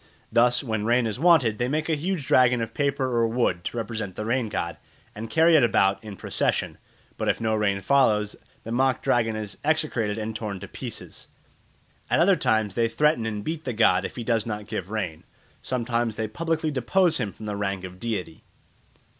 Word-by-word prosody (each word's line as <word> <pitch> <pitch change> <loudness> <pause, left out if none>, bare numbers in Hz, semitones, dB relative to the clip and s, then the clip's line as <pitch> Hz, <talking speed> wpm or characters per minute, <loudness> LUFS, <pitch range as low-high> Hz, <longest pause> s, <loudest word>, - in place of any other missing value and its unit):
Thus, 120 +3 +3
when 110 -4 -2
rain 120 +2 +2
is 110 +1 -3
wanted 145 -10 +4
they 120 - +1
make 155 +4 -1
a 165 - +1
huge 160 0 -2
dragon 125 -1 +4
of 115 -1 -4
paper 140 -2 0
or 115 -1 +3
wood 115 -7 0
to - - -4
represent 110 -4 -4
the 105 - -4
rain 120 0 0
god, 85 -5 -3 0.4
and 110 +2 -7
carry 165 +1 +5
it 150 - +6
about 100 -4 +2
in 105 -2 -8
procession; - - -1 0.4
but - - -1
if - - +1
no 110 -1 0
rain 100 -2 +1
follows, 105 -2 +2 0.3
the 115 - -7
mock 130 +2 +1
dragon 115 -2 +1
is 105 -1 -6
execrated 145 -9 0
and 110 0 -4
torn 105 -3 -4
to - - -8
pieces. - - -7 0.8
At - - +2
other 190 +2 +5
times 110 - +1
they 115 +3 +2
threaten 120 -1 +1
and 105 -2 -4
beat 160 +3 -4
the 125 - -3
god 95 -5 +3
if - - -5
he 120 - -5
does 115 -1 0
not 105 -1 -4
give 105 -4 -5
rain; 95 -8 -4 0.4
sometimes 120 -2 -1
they 110 0 -2
publicly 160 +6 -1
depose 160 +6 +2
him 100 - -2
from 110 - -11
the 105 -1 -3
rank 100 -2 -2
of 90 0 -9
deity. 105 -8 -4
115 Hz, 200 wpm, -25 LUFS, 105-130 Hz, 0.8 s, it